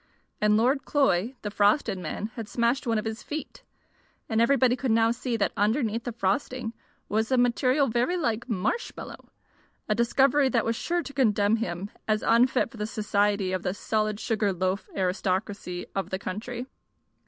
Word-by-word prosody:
And 210 0 +4
Lord 260 +5 +2
Cloy, 260 -5 +1
the 205 - -3
frosted 205 0 +2
man, 190 +6 -4
had 225 -3 -7
smashed 240 +4 0
one 225 -1 +2
of 215 - -2
his 220 0 -4
feet, 305 +1 -6 0.7
and 220 -1 +1
everybody 250 0 +4
could 260 0 -3
now 225 0 +4
see 240 0 -2
that 200 - +1
underneath 225 +2 0
the 245 - -2
frosting 225 +3 -1 0.3
was 220 +3 0
a 260 - +4
material 255 +3 +3
very 245 +10 +1
like 235 -7 -1
marshmallow 220 - -3 0.6
a 215 - +2
discovery 265 +4 +3
that 235 -3 +1
was 230 0 0
sure 345 +7 -1
to 280 - -9
condemn 215 -5 +3
him 190 -2 -4 0.2
as 215 0 +1
unfit 245 +1 +3
for - - -12
the 210 0 -2
society 205 -2 0
of 185 -1 -1
the 180 - -2
solid 215 0 -1
sugar 215 -4 0
loaf 185 +2 -2
aristocracy 185 -1 -2
of 190 -2 -2
the 190 - -2
country. 230 +6 -5
225 Hz, 170 wpm, -27 LUFS, 205-250 Hz, 0.7 s, And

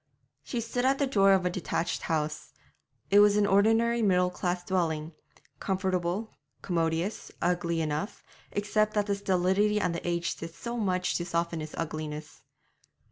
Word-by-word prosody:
She 240 - -3
stood 240 +2 -2
at 270 +1 +3
the 280 - +2
door 195 -7 +4
of 190 -1 +2
a 180 - +1
detached 175 -1 -2
house. 155 -1 -2 0.6
It 200 - +7
was 205 0 +6
an 210 - +4
ordinary 225 +4 +3
middle 180 -3 +3
class 180 0 -2
dwelling 165 -4 -1 0.5
comfortable, 190 +2 -1 0.3
commodious, 165 +2 -1
ugly 170 -2 0
enough, 155 +6 -3 0.3
except 215 +1 0
that 205 -1 +1
stolidity 200 +2 +2
and 170 -4 -1
age 170 -1 -1
did 165 0 -8
much 200 -6 0
to 175 - -3
soften 170 -1 -1
its 155 0 -7
ugliness. 155 -1 -5
185 Hz, 140 wpm, -29 LUFS, 170-205 Hz, 0.6 s, It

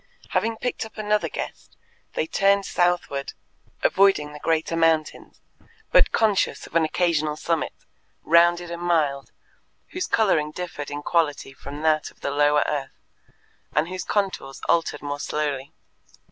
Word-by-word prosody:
Having 225 0 0
picked 245 - -2
up 220 0 -11
another 210 0 0
guest, - - -7 0.4
they - - 0
turned 195 +4 +2
southward, 175 -6 0 0.5
avoiding 190 -7 +3
the 150 - -9
greater 160 +1 0
mountains, 165 -1 0 0.5
but - - +5
conscious 215 -3 +1
of - - -15
an 165 - +5
occasional 155 -2 +1
summit, 165 +1 -1 0.5
rounded 170 +1 +4
and 170 0 -5
mild, 155 -6 0 0.6
whose 365 0 -3
colouring 175 -9 +2
differed 155 -3 -6
in 145 0 -5
quality 145 -5 0
from 145 +3 -8
that 155 -1 +2
of - - -24
the 140 - -2
lower 145 +1 +3
earth, 140 -3 -3 0.8
and 155 +4 +2
whose 185 0 -4
contours 190 -10 -2
altered 165 -3 +1
more 145 0 -3
slowly. 145 -3 -2
160 Hz, 140 wpm, -24 LUFS, 150-180 Hz, 0.8 s, but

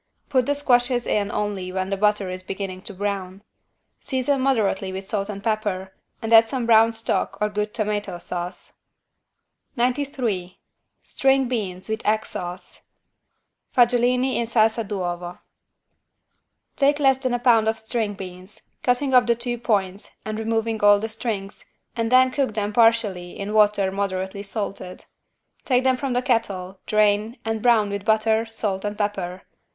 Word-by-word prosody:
Put 255 -4 +2
the 285 - +1
squashes 245 -3 +2
in 205 -1 0
only 200 -3 -3
when 190 +1 -3
the - - +1
butter 205 -1 +1
is 185 0 -6
beginning 190 0 -5
to - - -7
brown. 195 -1 -4 0.6
Season 265 +1 0
moderately 210 -7 +1
with 190 +1 -6
salt 200 0 -3
and 200 -1 -6
butter 205 -4 -2 0.3
and 225 +1 0
add 225 0 +7
some 255 -2 -2
brown 225 0 +6
stock 225 0 -1
or 210 - +1
good 210 0 -2
tomato 210 -4 -2
sauce. 175 +1 -6 1.0
93 245 -7 -1 0.5
STRING 270 -1 +2
BEANS 195 -7 -4
WITH 220 +1 -3
EGG 215 +1 +1
SAUCE 180 +2 -7 0.9
(Fagiuolini 250 +1 +3
in 235 - -1
salsa 225 0 +2
d'uovo) 175 -3 -4 1.4
Take 285 +1 +3
less 270 -2 +4
than 255 -2 -1
a - - +1
pound 235 -3 +4
of 220 0 +1
string 220 -1 -2
beans, 185 +1 -10 0.2
cutting 260 +2 +1
off 250 -1 +5
the 235 - +3
two 240 0 -4
points 200 -4 -2
and 215 0 -4
removing 225 0 -1
all 205 0 +6
the 225 +2 -4
strings, 215 -3 -5 0.3
and 230 -1 -1
then 255 0 +6
cook 265 -5 -1
them 210 -1 -2
partially 220 -6 +2
in 200 +1 -4
water 205 -2 +3
moderately 190 0 -3
salted. 195 -3 -6 0.6
Take 255 -1 +2
them 260 -1 +3
from 260 0 -3
the 245 +1 0
kettle, 200 -7 -1
drain, 215 +2 +2
and 225 -1 -2
brown 220 -4 +3
with 200 -1 -4
butter, 220 +1 +2
salt 210 -4 -3
and 205 0 -3
pepper. 190 -3 -3
215 Hz, 155 wpm, -23 LUFS, 195-240 Hz, 1.4 s, add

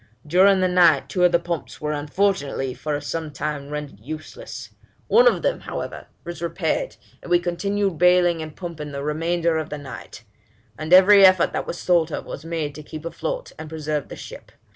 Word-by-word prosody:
During 185 +4 +4
the 185 - +3
night 165 -7 +4
two 180 +5 0
of 175 - +4
the 170 - +5
pumps 170 -2 -5
were 150 0 -2
unfortunately 145 -3 -1
for 150 +2 -3
some 155 +2 -4
time 145 0 -4
rendered 150 -7 -6
useless; 155 - -8 0.3
one - - +5
of - - +2
them, - - 0
however, - - -6 0.2
was 170 -2 -7
repaired, 170 - -2 0.3
and - - -11
we 175 - +5
continued 185 +1 -1
baling 180 -2 +4
and 155 -1 -8
pumping 160 -5 -7
the 140 0 -4
remainder 165 +2 0
of 155 0 -5
the 150 - -5
night; 140 -3 -10 0.5
and 155 +5 -6
every 195 +2 +8
effort 185 -2 +5
that - - -3
was 175 - -5
thought 170 -3 +3
of - - -4
was 140 - -8
made 160 -3 -3
to 150 - -9
keep 155 +1 -9
afloat - - -4
and 155 -1 -7
preserve 155 -2 -3
the - - -7
ship. - - -11
165 Hz, 190 wpm, -23 LUFS, 150-180 Hz, 0.5 s, every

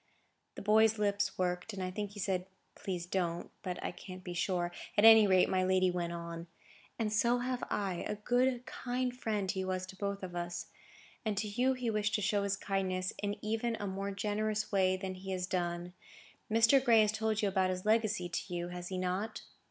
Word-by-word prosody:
The - - -7
boy's 220 +1 +5
lips 205 -1 0
worked, 180 +3 -1
and 190 -1 -4
I 185 - -2
think 205 +1 -4
he 205 - -9
said, 185 -1 -1 0.3
"Please, 180 -3 -4
don't." 175 -2 -2
But 180 -2 -4
I - - -2
can't 185 0 -10
be 180 - -5
sure; 175 0 0 0.3
at 205 - +6
any 220 -2 +9
rate, 185 -1 +5
my 185 0 +1
lady 185 0 +3
went 175 -1 -2
on: 170 0 -6 0.5
"And 215 -2 -1
so 235 +3 +3
have 250 0 -2
I,—a 195 -1 -2
good, 245 +3 +1
kind 250 0 -2
friend, 210 -6 -1
he 190 -1 -2
was 185 0 -2
to 190 +1 -11
both 200 0 -3
of 180 -1 -6
us; 175 0 -4 0.5
and 215 -3 -1
to 210 +2 0
you 250 +6 +2
he 250 -3 -2
wished 210 -1 +1
to 210 - 0
show 205 0 +2
his 200 0 0
kindness 185 -2 -1
in 205 0 -1
even 225 +1 0
a 205 - -3
more 195 +1 -3
generous 215 +2 -1
way 185 -2 +3
than 190 0 -4
he 190 +1 -9
has 180 -1 -1
done. 175 -1 -2 0.6
Mr. 230 +4 +5
Gray 230 -4 +6
has 210 -1 +3
told 220 0 -1
you - - +4
about 190 -1 +2
his 185 +1 -3
legacy 215 -4 +2
to 175 +2 -4
you, 175 0 -3
has 180 0 -6
he 185 - -4
not?" 185 +4 -2
195 Hz, 205 wpm, -33 LUFS, 185-215 Hz, 0.6 s, any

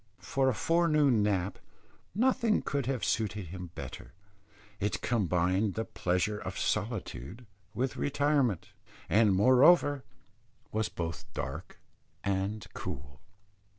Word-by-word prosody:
For 135 -1 +1
a - - +1
forenoon 150 -5 +3
nap 100 -2 0 0.6
nothing 235 -1 +2
could 140 -3 -2
have 130 -3 -1
suited 105 -5 -1
him 90 0 -7
better; - - -8 0.7
it 105 +1 -1
combined 95 -2 +1
the 115 - -2
pleasures 90 +4 -1
of - - -5
solitude 105 - -3 0.3
with 130 +1 -1
retirement, 140 - +1 0.4
and 110 0 +5
moreover 130 - +5 0.7
was 110 0 0
both 80 -2 -5
dark - - -5 0.4
and 100 +2 -1
cool. 70 +1 -7
110 Hz, 110 wpm, -30 LUFS, 95-135 Hz, 0.7 s, and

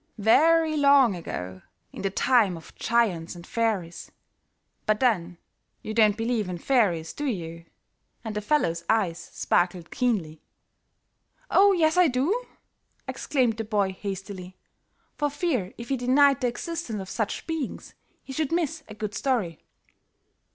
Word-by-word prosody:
"Very 310 +9 +4
long 280 -7 +5
ago, 95 - -6 0.3
in - - -7
the 195 - 0
time 215 -3 +2
of 165 - -14
giants 195 -8 0
and 170 0 -11
fairies, 205 -7 -2 0.8
But 215 0 +2
then 180 -9 +1 0.5
you 215 - -4
don't 215 -2 +4
believe 225 -3 -1
in 180 - -4
fairies, 175 -8 +1
do 295 - -3
you?" 165 -7 -4 0.6
and 220 -2 -5
the 210 - -1
fellow's 170 - +1
eyes 185 -7 +1
sparkled 175 -1 -1
keenly. 190 -12 -1 1.1
"Oh, 400 +1 +6
yes, 320 -1 +2
I 360 -1 +6
do," 315 - 0 0.6
exclaimed 250 -6 0
the 225 - -2
boy 205 -3 0
hastily, 190 -1 -7 0.6
for 295 - +1
fear 280 - -1
if 235 0 -8
he 270 - +1
denied 265 +2 +4
the 250 - +2
existence 245 -2 -4
of 190 - -6
such 220 -3 -3
beings, 320 -5 -5 0.3
he 270 - -8
should 310 +1 -1
miss 325 -2 -1
a 215 - -10
good 210 -1 -4
story. 220 - -1
225 Hz, 145 wpm, -26 LUFS, 185-275 Hz, 1.1 s, Oh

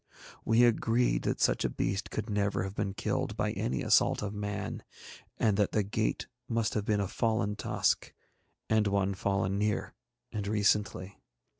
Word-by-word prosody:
We 115 +2 +4
agreed 120 - +2
that - - 0
such - - +2
a - - +1
beast 95 +1 -2
could 110 0 -4
never 100 -2 0
have 95 0 -5
been 100 -1 -2
killed - - -2
by - - 0
any 65 +1 -2
assault - - +3
of 105 0 -3
man, 105 -1 -4 0.6
and 105 -3 +2
that 105 -2 +1
the 105 - +2
gate 105 +2 -1 0.2
must 115 -2 0
have 105 -2 -1
been 105 -1 +1
a 100 - 0
fallen 110 -1 0
tusk, - - 0 0.6
and 110 -1 +3
one 100 -1 +1
fallen 95 0 0
near 105 0 -1 0.4
and 105 -2 -3
recently. 100 -2 0
105 Hz, 165 wpm, -30 LUFS, 100-110 Hz, 0.6 s, We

